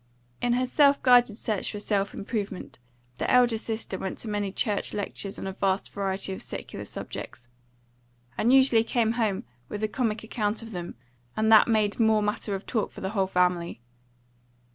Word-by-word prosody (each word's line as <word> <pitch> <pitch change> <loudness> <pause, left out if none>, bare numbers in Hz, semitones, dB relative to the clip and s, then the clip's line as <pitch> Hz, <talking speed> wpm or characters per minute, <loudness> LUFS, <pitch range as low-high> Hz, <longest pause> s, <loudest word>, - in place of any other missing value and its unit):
In 245 - +2
her 250 +1 +1
self 280 +2 +4
guided 245 -4 +5
search 215 -5 -2
for 210 - -6
self 200 -1 0
improvement, 200 - -5 0.4
the - - -1
elder 245 -3 +4
sister 220 -4 -3
went 190 - -4
to - - -7
many 205 -2 -2
church 205 0 -1
lectures 200 -1 -3
on - - -6
a 190 - -4
vast 195 0 -1
variety 195 -1 -1
of - - -7
secular - - -6
subjects, 120 +1 -7 0.9
and 235 - +2
usually 260 -4 +5
came 230 -1 +1
home 220 -5 0 0.3
with 210 +1 -5
a - - +2
comic 220 -1 -2
account 220 0 -2
of 225 - -9
them, 175 -3 -6 0.4
and 220 +1 +2
that 220 - +8
made 215 -2 +1
more 220 -2 +4
matter 210 0 -1
of 195 - -7
talk 220 -4 -1
for - - -11
the 190 - -2
whole 195 -3 +1
family. 180 -5 +1
210 Hz, 180 wpm, -27 LUFS, 195-230 Hz, 0.9 s, that